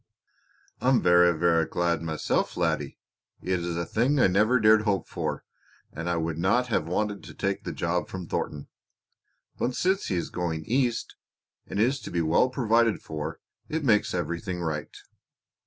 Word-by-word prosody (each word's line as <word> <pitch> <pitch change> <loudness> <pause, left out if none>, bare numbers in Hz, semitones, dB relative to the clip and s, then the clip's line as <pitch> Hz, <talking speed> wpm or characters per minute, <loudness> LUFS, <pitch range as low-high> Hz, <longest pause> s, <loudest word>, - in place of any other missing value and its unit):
"I'm 130 0 +4
verra, 90 -1 +5
verra 85 -1 +3
glad 85 -2 0
myself, 80 -2 -1
laddie. - - -1 0.5
It 90 0 0
is 85 -1 -3
a 85 - -1
thing 130 - +1
I - - +6
never 105 +7 +3
dared 110 0 +6
hope 100 -3 0
for, - - -3 0.5
and 85 +3 -4
I 85 - 0
would 80 -1 -2
not 120 +8 +2
have 80 -8 0
wanted 105 +3 -2
to - - -11
take 100 0 -2
the - - -3
job 90 +1 -1
from 95 -2 -6
Thornton. 75 -1 -3 0.9
But 125 - -1
since 190 +2 +1
he 95 - -1
is 85 - -3
going 80 -3 -3
East 120 -1 0 0.5
and - - -4
is 130 +6 +2
to 110 - -8
be 85 -1 0
well 80 +10 +3
provided 115 -3 +2
for 75 -1 -5 0.3
it 160 0 -2
makes 105 -7 +2
everything 85 +2 -3
right." 75 -2 -4
95 Hz, 170 wpm, -27 LUFS, 85-115 Hz, 0.9 s, I